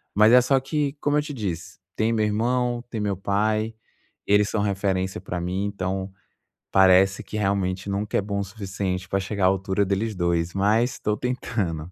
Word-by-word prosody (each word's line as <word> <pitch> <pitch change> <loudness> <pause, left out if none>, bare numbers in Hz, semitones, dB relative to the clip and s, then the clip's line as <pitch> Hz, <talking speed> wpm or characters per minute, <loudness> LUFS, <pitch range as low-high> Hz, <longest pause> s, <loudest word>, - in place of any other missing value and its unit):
Mas 105 +2 +6
é 125 - +9
só 135 +2 +3
que, 140 +1 -1
como 145 0 +2
eu 150 - +3
te 150 -1 -6
disse, 95 -9 -5 0.2
tem 110 +1 +2
meu 110 -1 +1
irmão, 120 +3 0
tem 110 -3 -4
meu 100 -2 -1
pai. 110 +3 0 0.5
Eles 105 0 +4
são 105 - 0
referência 95 -2 -1
para 90 -1 -4
mim. 90 +3 -2
Então 95 -1 -3 0.6
parece 95 0 +5
que 105 - -6
realmente 95 -1 -1
nunca 100 +2 -1
é - - +2
bom 100 0 -3
o 100 - 0
suficiente 95 -2 -4
para 100 - +1
chegar 95 0 -1
à - - +7
altura 95 +1 +1
deles 100 +3 -1
dois, 85 -1 0
mas 110 +5 +2
estou 105 - -1
tentando. 95 -9 -3
100 Hz, 185 wpm, -24 LUFS, 95-110 Hz, 0.6 s, é